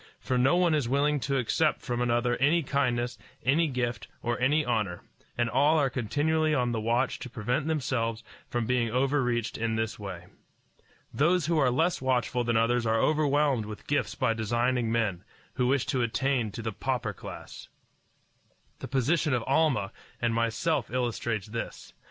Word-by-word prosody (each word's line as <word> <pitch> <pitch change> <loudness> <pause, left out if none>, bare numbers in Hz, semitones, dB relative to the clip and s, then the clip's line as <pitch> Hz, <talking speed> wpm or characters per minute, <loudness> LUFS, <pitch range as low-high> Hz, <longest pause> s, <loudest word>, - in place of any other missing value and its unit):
For 130 - -2
no 130 +6 +4
one 175 -2 +3
is 145 -6 0
willing 145 +2 +2
to 140 +1 -1
accept 145 +5 +1
from 120 -2 -2
another 120 0 +1
any 155 +5 +3
kindness, 120 -4 -1 0.3
any 155 +6 +3
gift, 120 -4 -2 0.2
or 120 +1 -1
any 145 +4 +2
honor, 105 -7 -1 0.3
and 120 0 +2
all 145 +7 +3
are 140 -4 +2
continually 150 +6 +1
on 125 -3 +1
the 115 -2 -2
watch 120 +4 0
to 125 - -7
prevent 125 +6 -2
themselves 120 -7 -1 0.3
from 120 -1 -1
being 120 -1 +1
overreached 125 -2 0
in 115 0 0
this 110 -1 -2
way. 95 -4 -7 0.9
Those 170 +2 +2
who 165 0 +1
are 135 -3 +4
less 160 +7 +1
watchful 125 -1 0
than 120 -1 +1
others 120 +2 +2
are 110 0 +1
overwhelmed 145 -5 +2
with 105 -1 -8
gifts 145 - -1
by 125 -4 +1
designing 120 +2 0
men, 105 -6 0 0.3
who 125 -2 0
wish 135 0 +2
to 130 - 0
attain 120 0 0
to 115 - -6
the 110 - -2
pauper 125 -3 -2
class. - - -10 1.1
The - - -6
position 140 +3 +1
of 120 - -1
Almah 135 -9 +2 0.3
and 120 -1 0
myself 115 +8 0
illustrates 120 -4 -2
this. 115 +2 -6
125 Hz, 170 wpm, -28 LUFS, 115-140 Hz, 1.1 s, no